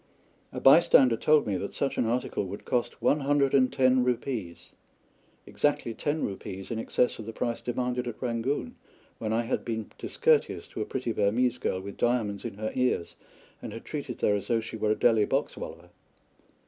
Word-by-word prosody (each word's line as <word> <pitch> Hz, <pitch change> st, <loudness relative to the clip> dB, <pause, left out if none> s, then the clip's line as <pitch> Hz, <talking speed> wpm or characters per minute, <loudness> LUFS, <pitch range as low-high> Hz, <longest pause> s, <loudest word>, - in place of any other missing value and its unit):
A -, -, -5 dB
bystander 135 Hz, -4 st, +6 dB
told 150 Hz, +5 st, +3 dB
me 100 Hz, -3 st, -1 dB
that 100 Hz, -, -5 dB
such 140 Hz, -, -1 dB
an 115 Hz, -, +1 dB
article 120 Hz, -2 st, -1 dB
would 100 Hz, +2 st, -8 dB
cost 125 Hz, -2 st, -2 dB
one 150 Hz, -, +3 dB
hundred 140 Hz, -1 st, +2 dB
and 130 Hz, -2 st, +4 dB
ten 130 Hz, -1 st, +3 dB
rupees 120 Hz, -8 st, -3 dB, 0.7 s
exactly 145 Hz, -5 st, 0 dB
ten 150 Hz, +6 st, -2 dB
rupees 95 Hz, 0 st, -6 dB
in 115 Hz, -, -2 dB
excess 120 Hz, +2 st, 0 dB
of 110 Hz, -, -7 dB
the -, -, -4 dB
price 115 Hz, +1 st, -3 dB
demanded 125 Hz, 0 st, -2 dB
at 120 Hz, -, -6 dB
Rangoon, 120 Hz, +3 st, -2 dB, 0.4 s
when 110 Hz, -1 st, -2 dB
I 115 Hz, +1 st, +1 dB
had 115 Hz, -, -2 dB
been 110 Hz, -2 st, -4 dB
discourteous 465 Hz, -1 st, +1 dB
to -, -, -5 dB
a -, -, -1 dB
pretty 125 Hz, -3 st, -3 dB
Burmese 120 Hz, +4 st, +1 dB
girl 95 Hz, -6 st, -1 dB
with 100 Hz, +1 st, -8 dB
diamonds 115 Hz, -4 st, 0 dB
in -, -, -5 dB
her 110 Hz, +1 st, -3 dB
ears, 125 Hz, -9 st, 0 dB, 0.5 s
and -, -, -6 dB
had -, -, -9 dB
treated -, -, -5 dB
her 105 Hz, -, +3 dB
as 100 Hz, -, -2 dB
though 115 Hz, -2 st, +2 dB
she 115 Hz, 0 st, -7 dB
were 110 Hz, -1 st, 0 dB
a 105 Hz, -, +3 dB
Delhi 110 Hz, -3 st, +4 dB
boxwallah. -, -, -3 dB
120 Hz, 185 wpm, -28 LUFS, 110-130 Hz, 0.7 s, bystander